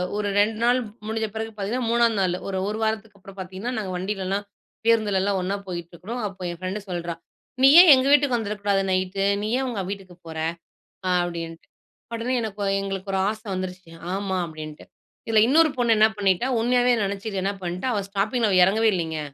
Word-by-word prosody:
ஒரு 210 -1 -1
2 215 +1 +2
நாள் 245 +1 +4 0.3
முடிஞ்ச 220 0 -1
பிறகு 225 0 -4
பாத்தீங்கன்னா 230 +4 -2
3 235 0 +4
நாளு, 180 -1 +1
ஒரு, 190 -1 -2
1 215 - -3
வாரத்துக்கு 220 -2 -2
அப்புறம் 195 +1 -14
பாத்தீங்கன்னா, 190 +7 -5
நாங்க 195 -4 -3
வண்டிலலா 195 +1 -2 0.5
பேருந்துல 215 -4 +3
எல்லாம் 195 -1 0
ஒண்ணா 195 +2 -1
போயிட்டு 170 -1 -6
இருக்கோம். 230 +8 -6
அப்போ 190 -1 -11
என் 170 - -9
பிரெண்டு 190 +3 -3
சொல்றா 170 -1 -3 0.5
நீ 270 - +8
ஏன் 355 -2 +9
எங்க 260 +1 +3
வீட்டுக்கு 285 -3 +4
வந்திருக்க 210 -2 -3
கூடாது 195 -1 +3
நைட்டு? 185 +1 0 0.2
நீ 210 - -2
ஏன் 265 - -1
அவங்க 235 -6 -3
வீட்டுக்குப் 190 -3 -8
போற? 160 -1 -8 0.8
அப்படின்டு. 170 -2 -2 0.5
உடனே 235 +3 -2
எனக்கொ 210 -2 -4 0.2
எங்களுக்கு 195 0 -4
ஒரு 190 - +1
ஆசை 215 +1 -6
வந்துருச்சு. 185 -2 -6 0.2
ஆமா 195 -1 -2
அப்படின்டு 155 -1 -9 0.4
இதுல 220 -1 +4
இன்னொரு 315 +3 +5
பொண்ணு 235 -2 +3
என்ன 215 +1 +6
பண்ணிட்டா? 195 +4 +2
உண்மையாவே 245 +1 +3
நினைச்சுக்கிட்டு 195 0 -3
என்ன 200 - +1
பண்ணிட்டா? 180 +8 -3
அவ 205 - 0
ஸ்டாப்பிங்ல 215 +3 0
அவ 185 - +3
எறங்கவே 220 +3 +3
இல்லீங்க. 160 -2 -2
200 Hz, 185 wpm, -24 LUFS, 185-225 Hz, 0.8 s, ஏன்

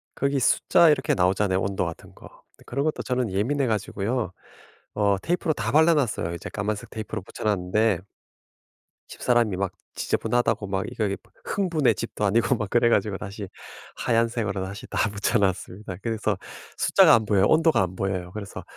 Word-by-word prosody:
거기 140 0 0
숫자 170 +6 +4
이렇게 140 -3 +2
나오잖아요 95 +1 +2
온도 95 -2 -1
같은 85 -1 -8
거. - - -13
근데 - - -23
그런 140 +4 -2
것도 155 - -1
저는 125 -3 -1
예민해 130 +8 0
가지고요. 110 0 -1 0.6
어 100 -2 +2
테이프로 170 -1 0
다 115 -4 -3
발라 160 +3 +6
놨어요. 105 - -1
이제 85 - -7
까만색 105 0 -3
테이프로 110 -1 -5
붙여 - - -9
놨는데 105 0 +1 1.1
집사람이 120 -5 +1
막 95 -1 -1 0.2
지저분하다고 115 -4 0
막 95 -1 -2
이거 110 - -2
이 100 -1 -1
뭐 - - -28
흥부네 160 - +1
집도 105 +2 -3
아니고 115 +6 +2
막 105 -4 -4
그래 120 +2 +3
가지고 105 -3 +1
다시 100 0 -7 0.5
하얀색으로 115 -4 0
다시 100 +6 -8
다 110 - 0
붙여 100 +4 0
놨습니다. 95 0 -2
그래서 110 -3 -1 0.4
숫자가 - - +6
안 110 -2 +1
보여요. 100 -1 +3
온도가 160 - +4
안 90 0 -2
보여요. 90 -2 -3
그래서 105 -2 -7
105 Hz, 395 characters per minute, -25 LUFS, 95-120 Hz, 1.1 s, 발라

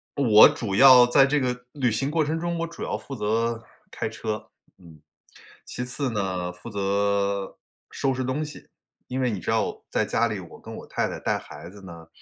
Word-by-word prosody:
我 115 -7 +8
主 105 -5 -4
要 125 +2 +8
在 135 +3 +5
这 145 +1 +1
个 125 -1 -3
旅 130 -5 0
行 135 +6 -1
过 160 0 +1
程 160 +2 -2
中 170 0 -2
我 170 - -1
主 165 0 -11
要 - - -2
负 140 - -10
责 115 +1 -1 0.3
开 - - -3
车， 110 -1 -5 0.3
嗯， 80 -4 -17 0.6
其 125 - -5
次 130 +2 -2
呢， 95 -4 -2
负 90 +6 -11
责 100 -1 -1 0.3
收 135 -1 0
拾 130 0 -3
东 130 +5 -2
西。 150 -1 -10 0.4
因 130 +1 -4
为 130 -1 +1
你 105 -5 -3
知 - - -2
道， - - -1
在 - - 0
家 115 - +1
里 105 -3 -4
我 85 - -12
跟 - - -10
我 - - -10
太 - - -1
太 - - -6
带 - - 0
孩 - - -11
子 100 +2 -14
呢， 85 -3 -11
115 Hz, 220 characters per minute, -25 LUFS, 100-135 Hz, 0.6 s, 我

